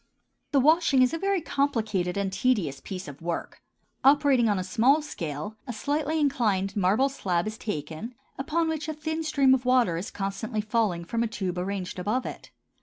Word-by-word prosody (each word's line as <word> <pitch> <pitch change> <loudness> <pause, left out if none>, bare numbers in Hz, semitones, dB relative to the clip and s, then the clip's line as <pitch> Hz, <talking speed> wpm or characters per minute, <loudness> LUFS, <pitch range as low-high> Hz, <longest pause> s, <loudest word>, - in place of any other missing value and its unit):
The 280 - +4
washing 300 -2 +4
is 250 - +2
a 330 - -2
very 390 -1 +1
complicated 220 - -1
and 195 -1 -1
tedious 195 - +1
piece 185 -3 -6
of 145 +1 -10
work. 170 0 -4 0.4
Operating 275 -4 +5
on 205 - +2
a 185 - -1
small 235 +10 +3
scale, 170 - -5
a 245 - -4
slightly 295 +6 -1
inclined 215 -10 +1
marble 205 +7 +3
slab 185 -10 -1
is 215 0 -4
taken, 165 - -5 0.2
upon 325 +4 0
which 315 -1 -3
a 310 - -3
thin 315 +1 -3
stream 280 -4 +3
of 260 -1 +1
water 250 -9 +3
is 190 +8 -4
constantly 205 +1 -3
falling 210 -6 0
from 230 +6 -2
a 235 - +1
tube 185 -5 -3
arranged 185 0 -4
above 215 +8 -1
it. - - -7
225 Hz, 180 wpm, -27 LUFS, 190-280 Hz, 0.4 s, Operating